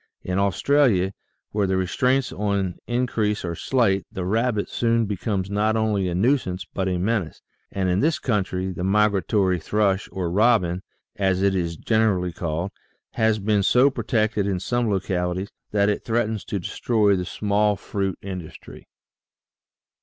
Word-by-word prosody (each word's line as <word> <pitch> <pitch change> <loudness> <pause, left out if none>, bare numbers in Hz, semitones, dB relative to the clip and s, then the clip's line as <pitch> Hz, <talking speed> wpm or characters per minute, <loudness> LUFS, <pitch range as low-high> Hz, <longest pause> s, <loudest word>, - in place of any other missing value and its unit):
In 90 +1 -1
Australia, 100 -1 +2 0.4
where 105 -2 0
the 95 0 +1
restraints 125 +8 +1
on 100 -3 -1
increase 115 -5 0
are 85 - -2
slight, 100 0 +1
the 95 - -4
rabbit 110 +2 0
soon 115 -1 +1
becomes 100 -1 -2
not 105 +2 +1
only 105 -4 +1
a 85 - -2
nuisance 95 -4 +1
but 95 -1 -1
a 90 -1 0
menace, 95 -3 -2 0.3
and 95 -1 -1
in 90 +1 +2
this 155 +4 +2
country 95 -6 -1
the 90 0 -5
migratory 100 -1 +2
thrush 100 +3 0
or 90 -3 -3
robin, 95 -4 +3 0.4
as 95 -1 +1
it 100 -1 +3
is 85 -3 -2
generally 105 -5 +1
called, 85 +3 -3 0.4
has 110 -1 +2
been 105 0 +1
so 125 +7 +4
pro - - -5
tected 110 -4 +1
in 95 -2 -1
some 120 +4 0
localities 95 -1 -1 0.2
that 100 -1 +2
it 105 - 0
threatens 110 -2 -1
to 100 - -3
destroy 105 +2 +1
the 90 - -2
small 105 +2 +1
fruit 95 -1 -3
industry. 90 -5 -9
100 Hz, 155 wpm, -23 LUFS, 95-110 Hz, 0.4 s, so